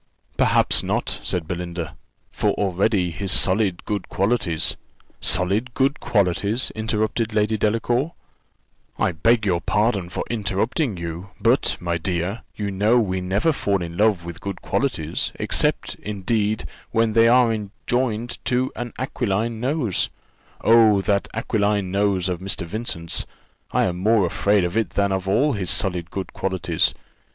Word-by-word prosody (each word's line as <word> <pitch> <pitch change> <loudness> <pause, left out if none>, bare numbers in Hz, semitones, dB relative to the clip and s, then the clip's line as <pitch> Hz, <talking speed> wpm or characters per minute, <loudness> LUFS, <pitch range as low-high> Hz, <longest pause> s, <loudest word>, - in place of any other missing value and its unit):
"Perhaps - - +4
not," - - -2
said 85 -3 -2
Belinda; 85 -3 -4 0.4
"for - - 0
already 95 -1 +1
his 95 +3 -3
solid 95 -2 +2
good 100 -3 -3
qualities 95 -6 +1 0.2
" - - -34
"Solid 100 +7 -1
good 135 +2 +1
qualities!" 100 +4 +1
interrupted 110 0 -1
Lady 105 +1 +2
Delacour: 120 +8 0 0.8
"I - - +1
beg 110 +7 +2
your 90 -4 +1
pardon 105 -4 +1
for - - -3
interrupting 110 - -1
you, 85 +3 -6
but, 115 +5 +2
my 85 -1 -2
dear, 90 +5 -2
you 100 -1 -3
know 105 +5 +3
we 95 -5 0
never 100 - +1
fall 100 -8 0
in 85 0 -6
love 100 -3 +2
with 85 0 -8
good 100 -2 -6
qualities, 85 - -1
except, - - 0
indeed, 105 +1 -1 0.2
when 115 -1 +1
they 115 0 +5
are 115 -4 +3 0.2
joined 120 -1 -1
to 125 +1 +1
an 120 -1 -5
aquiline 115 -3 -1
nose 125 - 0 0.5
oh! 110 -3 +5
that 100 0 +1
aquiline 105 -4 0
nose 100 -2 +1
of 90 -2 -2
Mr. 95 -1 -2
Vincent's! 85 -4 -3 0.4
I - - +2
am 90 0 -1
more 105 0 +3
afraid 100 +3 +2
of 90 +2 -2
it 115 -1 +1
than 100 -1 0
of 95 0 -2
all 135 +9 +3
his 95 -5 -2
solid 90 -4 0
good 95 -1 -5
qualities. 95 -2 0
100 Hz, 145 wpm, -22 LUFS, 90-115 Hz, 0.8 s, they